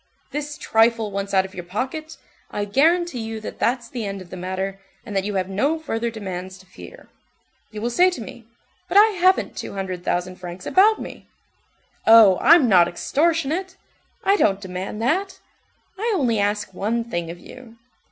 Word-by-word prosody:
This 295 0 -4
trifle 225 -1 +2
once 200 0 -4
out 190 -1 +3
of 190 - -11
your 175 - -7
pocket, 265 - -5 0.3
I 205 - -3
guarantee 320 - +2
you 225 0 -5
that - - -8
that's 240 0 0
the 240 -1 -5
end 195 -1 -4
of 185 -2 -13
the - - -6
matter, 190 +2 -4 0.3
and 210 - -7
that 195 0 0
you 205 -1 -3
have 185 -1 0
no 275 +12 0
further 235 -7 -3
demands 190 -4 -6
to 185 - -18
fear. - - -13 0.6
You 215 -1 -8
will 240 - -1
say 360 +9 +5
to 360 - -6
me: 225 +1 -10 0.4
'But 365 - +2
I 415 - +9
haven't 370 -2 +2
two - - -6
hundred 190 -2 -5
thousand 180 +1 -2
francs 180 0 -9
about 425 +3 +4
me.' - - -9 0.8
Oh! 220 -5 +8
I'm 305 -1 +6
not 180 -5 +5
extortionate. 330 - -1 0.5
I 400 +1 +3
don't 195 - +2
demand 190 +3 -5
that. 380 +10 0 0.6
I 460 +2 0
only 235 -7 +1
ask 205 +1 -1
one 230 +4 -1
thing 175 -8 -4
of 170 - -7
you. 230 +4 -14
225 Hz, 180 wpm, -22 LUFS, 190-295 Hz, 0.8 s, I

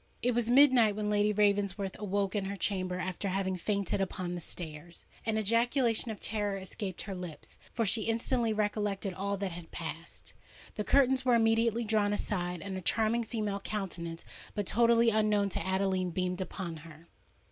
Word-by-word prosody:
It 245 +1 +2
was 235 0 +1
midnight 250 -5 +6
when 210 0 -1
Lady 210 0 +3
Ravensworth 200 -1 +1
awoke 200 -1 -1
in 200 -2 0
her 200 +1 -3
chamber, 185 -2 -1
after 185 +2 -3
having 190 0 -1
fainted 200 +1 -1
upon 185 -2 -3
the 175 - -4
stairs. 165 0 -6 0.2
An 220 -1 +1
ejaculation 230 +2 +2
of 215 -3 -5
terror 205 -2 -2
escaped 190 0 -5
her 195 - -5
lips—for 180 +6 -5
she 215 +2 +1
instantly 230 +1 +1
recollected 205 -2 -1
all 200 +2 -2
that 195 -1 -3
had 170 -1 -8
passed. 165 0 -7 0.4
The 210 - -3
curtains 265 +1 +3
were 250 -2 +4
immediately 230 0 +3
drawn 210 -2 +2
aside; 180 -4 -2
and 195 -1 -5
a 185 - -4
charming 225 +5 +2
female 210 -3 -2
countenance, 175 -5 -4 0.3
but 205 -2 -1
totally 235 +2 +4
unknown 210 -2 +2
to - - -3
Adeline, 190 -1 0
beamed 180 +1 -2
upon 180 -3 -5
her. 160 +1 -13
200 Hz, 170 wpm, -31 LUFS, 185-220 Hz, 0.4 s, midnight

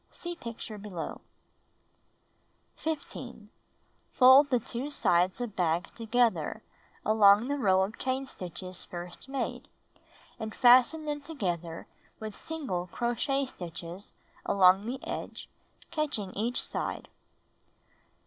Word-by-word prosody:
(See 345 0 -6
picture 230 -7 -7
below.) 195 -5 -6 1.6
15. 255 -8 -5 0.6
Fold 265 +3 +7
the 255 - +4
two 240 +5 -5
sides 185 -7 +2
of 240 -4 -4
bag 170 -1 0
together, 230 +1 +1 0.4
along 215 +1 +6
the 285 +1 -1
row 190 -5 +4
of 205 +4 -5
chain 260 +1 -1
stitches 185 -5 -7
first 175 +8 -8
made, 255 0 -3 0.7
and 220 -1 -5
fasten 255 +5 +6
them 295 -1 -3
together 175 - -4 0.3
with 215 -1 -6
single 260 - -4
crochet 255 +7 0
stitches 175 -3 -8 0.3
along 190 +2 +5
the 260 +2 -5
edge, - - -5 0.4
catching 290 - -2
each 235 +5 -1
side. - - -3
225 Hz, 110 wpm, -29 LUFS, 185-265 Hz, 1.6 s, Fold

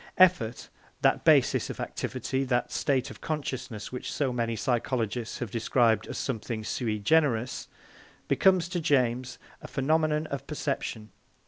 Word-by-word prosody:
Effort, 175 -11 +3 0.3
that - - +3
basis - - +4
of - - -6
activity, 135 +1 -2
that 125 -2 0
state 135 -2 0
of - - -12
consciousness 130 -8 -4
which 125 - -5
so 135 -4 0
many 115 -1 -1
psychologists 120 -1 -1
have 120 -5 -5
described 115 -1 +2
as - - -5
something 115 -3 -3
sui 110 -1 -2
generis, 125 +1 +1 0.6
becomes 185 -3 +4
to 175 0 -2
James 130 -5 +1 0.2
a - - -8
phenomenon 155 +2 +1
of 140 - -4
perception. 135 -7 -3
125 Hz, 135 wpm, -28 LUFS, 115-150 Hz, 0.6 s, basis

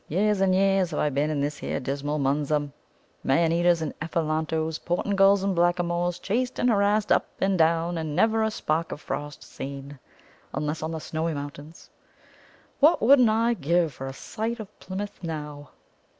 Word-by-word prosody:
Years 200 +4 +1
and 190 -1 +3
years 195 -1 +3
have 150 - -3
I 150 - +1
been 145 +3 0
in 150 -2 -1
this 145 0 -2
here - - -3
dismal 140 +3 -3
Munza. 145 +1 0 0.5
Man 165 +5 +2
eaters 170 -1 +3
and 150 - -4
Ephelantoes, 160 -1 -1
Portingals 195 +2 +2
and 195 -1 0
blackamoors, 175 0 +1
chased 245 +7 -2
and 245 - +2
harassed 205 0 +2
up - - +3
and 195 0 +2
down, 165 0 +2
and 155 -2 -4
never 225 +3 +3
a 220 - +2
spark 165 -5 -2
of - - -5
frost 145 -1 -6
seen, 140 0 -8 0.6
unless 150 +1 -2
on 155 - -2
the 160 -1 -4
Snowy 160 +1 -3
Mountains. 145 +2 -9 0.9
What 310 +2 +5
wouldn't 250 -1 +6
I 230 +2 +2
give 170 -3 +1
for 135 - -7
a - - -4
sight 230 - -4
of 210 -1 -10
Plymouth 200 +2 -6
now!" 150 -4 -6
165 Hz, 170 wpm, -26 LUFS, 150-195 Hz, 0.9 s, wouldn't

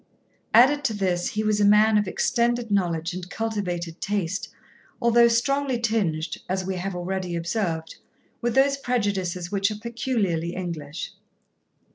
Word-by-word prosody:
Added 280 +5 +6
to 225 - +1
this, 180 -3 0
he 215 - -2
was 215 -1 +1
a - - +4
man 210 +2 +5
of 210 -2 +2
extended 235 +3 0
knowledge 170 -3 0
and 180 0 -6
cultivated 180 -6 -3
taste, 200 -2 -2 0.5
although 235 0 +5
strongly 265 +3 +1
tinged, 180 -9 -1
as 185 0 -1
we 190 0 -2
have 185 +1 -3
already 180 0 -3
observed, 170 -2 -2 0.4
with 240 -1 -1
those 275 +1 +4
prejudices 200 -9 -1
which 200 0 +1
are 215 - -4
peculiarly 215 -7 -2
English. 165 -4 -5
200 Hz, 140 wpm, -25 LUFS, 175-230 Hz, 0.5 s, Added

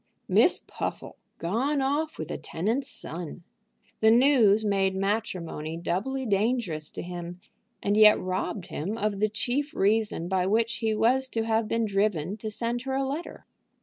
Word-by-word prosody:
Miss - - +5
Puffle - - -5 0.2
gone 245 - 0
off 290 +4 -1
with - - -5
the - - -3
tenant's 230 +11 -2
son! 170 -4 -6 0.6
The 220 - +5
news 230 -4 +5
made 195 -2 +1
matrimony 185 -6 -2
doubly 220 +11 -2
dangerous 200 - 0
to - - -7
him, 175 0 -7 0.4
and 205 0 +1
yet 215 0 +7
robbed 185 +1 -3
him 190 +6 -4
of 210 -2 -1
the 215 +1 +2
chief 255 +7 -2
reason 205 -3 +1
by 185 0 +1
which 230 +3 +1
he 220 -2 0
was 260 +4 +3
to 225 -2 -1
have 225 0 +1
been 230 +1 0
driven 195 -4 0
to 220 - -5
send 235 +3 -2
her 265 +1 -3
a 270 0 0
letter. 295 +6 -6
215 Hz, 160 wpm, -27 LUFS, 190-240 Hz, 0.6 s, yet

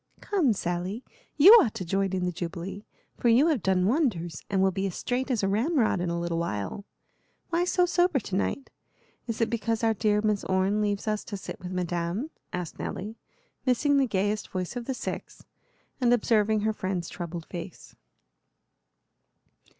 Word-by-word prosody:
"Come, 360 - +1
Sally, 180 +5 -3 0.3
you 355 +9 +10
ought 220 - -1
to 185 - -4
join 195 +2 0
in 185 -1 0
the 180 - 0
jubilee, 175 +4 -6 0.3
for 240 - +3
you 260 +8 +5
have 290 -9 +1
done 185 -1 +2
wonders, 195 - 0
and 195 - +1
will 190 0 +4
be 195 +1 -1
as 185 - -5
straight 255 +2 -2
as 235 -6 0
a - - +3
ramrod 225 - +1
in 175 - -1
a 170 0 -1
little 170 -1 -1
while. 170 - -3 0.7
Why 340 +1 +2
so 360 0 +3
sober 350 -2 +2
to 195 -4 -5
night? 265 +7 -2 0.6
Is 230 0 -3
it 230 - +2
because 230 -1 -1
our 225 0 +4
dear 210 0 +2
Miss 210 -2 +1
Orne 190 +3 +1
leaves 205 0 -1
us 215 -1 0
to 205 - -5
sit - - -8
with 180 0 -7
Madame?" 180 - -2 0.2
asked 180 -2 -5
Nelly, 215 +4 -5 0.4
missing 280 +3 +2
the 270 -1 +3
gayest 205 0 -1
voice 185 +4 -4
of 245 -1 -4
the 265 - -2
six, - - -6 0.6
and 240 -1 +4
observing 220 -2 +3
her 220 +1 +1
friend's 185 -4 -3
troubled 170 -2 -6
face. 175 0 -8
205 Hz, 180 wpm, -27 LUFS, 180-240 Hz, 0.7 s, you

